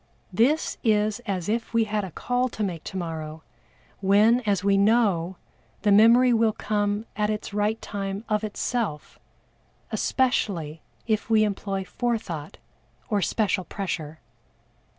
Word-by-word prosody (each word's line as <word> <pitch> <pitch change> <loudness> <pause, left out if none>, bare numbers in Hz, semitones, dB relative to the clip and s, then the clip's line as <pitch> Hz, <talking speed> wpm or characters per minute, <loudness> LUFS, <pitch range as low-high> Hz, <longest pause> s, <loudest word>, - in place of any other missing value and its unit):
This 270 - +2
is 215 -2 +2
as 185 -4 -2
if 230 +2 -2
we 230 - +5
had 210 -1 -1
a 190 - -5
call 245 +8 -1
to 215 - -4
make 175 -5 -3
tomorrow, 160 -3 -5 0.6
when, 205 +5 +4
as 200 -2 +1
we 200 0 +3
know, 195 -4 +2 0.5
the 205 - +3
memory 235 +4 +6
will 225 -1 +3
come 205 0 -1
at 210 0 0
its 210 -1 -4
right 210 +2 0
time 200 +1 -4
of 210 0 0
itself, 210 -5 -3 0.7
especially 180 - 0 0.2
if 220 -1 -1
we 220 -1 +5
employ 195 -2 -2
Forethought 185 -8 -3 0.5
or 205 -1 +2
special 190 +2 0
pressure. 160 -5 -5
205 Hz, 130 wpm, -25 LUFS, 190-225 Hz, 0.7 s, memory